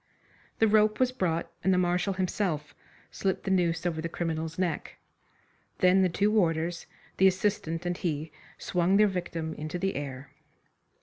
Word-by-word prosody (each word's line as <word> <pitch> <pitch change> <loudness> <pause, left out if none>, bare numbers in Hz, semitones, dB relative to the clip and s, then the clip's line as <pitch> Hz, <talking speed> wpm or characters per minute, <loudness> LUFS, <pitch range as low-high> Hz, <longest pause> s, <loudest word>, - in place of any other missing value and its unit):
The 225 - +4
rope 215 0 +3
was 255 -1 +3
brought, 170 -8 -1
and 190 - +3
the 185 - +3
Marshal 180 +2 +1
himself 185 -5 -2 0.4
slipped 190 -1 -2
the 190 - -2
noose 170 -2 +1
over 160 -2 -1
the 165 - -3
criminal's 160 -1 -3
neck. 175 -4 -2 0.8
Then 185 +1 +5
the 185 - +3
two 200 +5 +1
warders, 170 -4 0 0.3
the 190 - +6
assistant 185 -3 0
and 175 0 -1
he 160 -4 -3 0.3
swung 180 +2 +1
their 210 - +6
victim 170 -4 -3
into 155 +3 -5
the 195 +2 -1
air. 140 -1 -6
175 Hz, 160 wpm, -28 LUFS, 165-190 Hz, 0.8 s, the